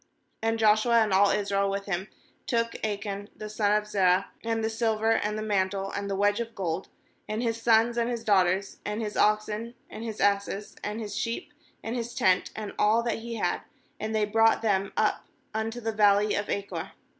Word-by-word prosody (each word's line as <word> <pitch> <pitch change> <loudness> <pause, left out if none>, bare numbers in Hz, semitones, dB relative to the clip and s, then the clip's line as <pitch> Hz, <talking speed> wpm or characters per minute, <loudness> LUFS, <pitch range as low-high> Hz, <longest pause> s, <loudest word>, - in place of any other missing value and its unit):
MAnd 225 0 +1
Joshua, 225 +1 +4
and 210 -3 -1
all 200 +1 +5
Israel 200 -1 +1
with 200 0 -3
him, 190 0 -2 0.4
took 230 -2 0
Achan 205 -1 -3
the 215 - -7
son 210 -1 +1
of 210 0 +2
Zerah, 190 -2 +2
and 225 -1 -1
the 220 - +1
silver, 225 -1 +1
and 210 -1 +1
the 215 - -3
mantle, 195 -2 0
and 200 0 -4
the 195 - -1
wedge 205 +2 +2
of 230 -1 -5
gold, 175 -1 -2 0.4
and 215 +3 -2
bis 230 -1 -1
sons, 230 +1 +4
and 235 0 +1
his 235 -2 -3
daughters, 190 -1 +2
and 210 +1 -3
his 210 -2 -3
oxen, 215 +2 +1 0.2
and 220 - -7
his 220 -2 -5
asses, 200 0 0
and 210 +2 -3
his 210 -2 -5
sheep, 230 +6 -3 0.3
and 225 +2 -3
his 240 0 -4
tent, 185 -5 +3
and 215 -2 -5
all 220 +3 +4
that 235 -1 -1
he 230 +1 -6
had; 180 -5 -1 0.4
and 220 +1 -3
they 215 -1 +2
brought 225 +2 +3
them 195 -3 +1
up - - +1 0.3
unto 220 +2 -2
the 225 -1 -2
valley 205 0 +4
of 205 - -2
Achor. 200 0 -4
215 Hz, 200 wpm, -27 LUFS, 200-225 Hz, 0.4 s, all